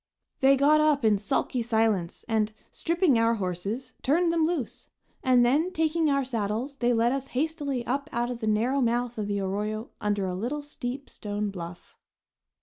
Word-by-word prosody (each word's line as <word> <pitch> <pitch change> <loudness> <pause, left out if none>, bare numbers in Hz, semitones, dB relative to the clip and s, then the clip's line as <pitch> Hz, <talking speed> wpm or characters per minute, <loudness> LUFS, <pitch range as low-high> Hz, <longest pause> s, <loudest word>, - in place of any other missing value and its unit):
They 270 +1 +5
got 300 +3 +5
up 295 -5 +3
in 210 -2 +4
sulky 220 +4 -1
silence, 220 -6 0
and, 220 -2 +1 0.2
stripping 335 -7 +2
our 230 0 +3
horses, 200 +6 -4
turned 335 +5 +2
them 325 -2 +3
loose; 320 -9 -4 0.3
and 250 -2 +5
then, 300 +9 +2
taking 320 -2 +1
our 275 -1 +1
saddles, 235 +3 -2
they 245 -2 +2
led 235 0 +3
us 270 0 -2
hastily 285 -4 -1
up 280 +4 -2
out 240 +1 -1
of 240 - -5
the 220 - -3
narrow 235 +6 +2
mouth 240 -1 0
of 210 - -2
the 205 -1 -1
arroyo 210 +4 -3
under 205 -2 0
a 185 - -2
little 255 +10 -3
steep 275 -2 -5
stone 205 0 -4
bluff. 175 -2 -9
240 Hz, 175 wpm, -27 LUFS, 215-280 Hz, 0.3 s, They